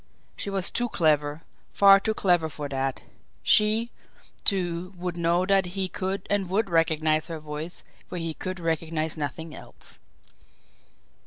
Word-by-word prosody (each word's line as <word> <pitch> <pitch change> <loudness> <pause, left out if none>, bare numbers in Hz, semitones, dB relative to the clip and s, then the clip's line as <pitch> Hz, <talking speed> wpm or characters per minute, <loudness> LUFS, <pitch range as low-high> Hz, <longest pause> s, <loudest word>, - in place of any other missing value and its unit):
She - - -5
was 195 -2 +1
too 240 0 0
clever, 150 -3 +1 0.3
far 195 -1 +8
too 220 +2 -1
clever 175 -6 +2
for 145 -1 -5
that 135 -1 -2 0.4
she, 220 +2 +3 0.5
too, 180 -1 -1
would 175 0 -3
know 170 +1 +2
that 195 -1 +3
he 190 -1 +1
could 190 +1 -3
and 200 -3 0
would 195 0 0
recognise 160 -1 +2
her 165 -2 -4
voice 155 +2 -6 0.3
where - - -5
he 165 -1 -3
could 185 +3 -5
recognise 160 -1 -1
nothing 155 +1 -4
else. - - -9
175 Hz, 145 wpm, -26 LUFS, 155-195 Hz, 0.5 s, far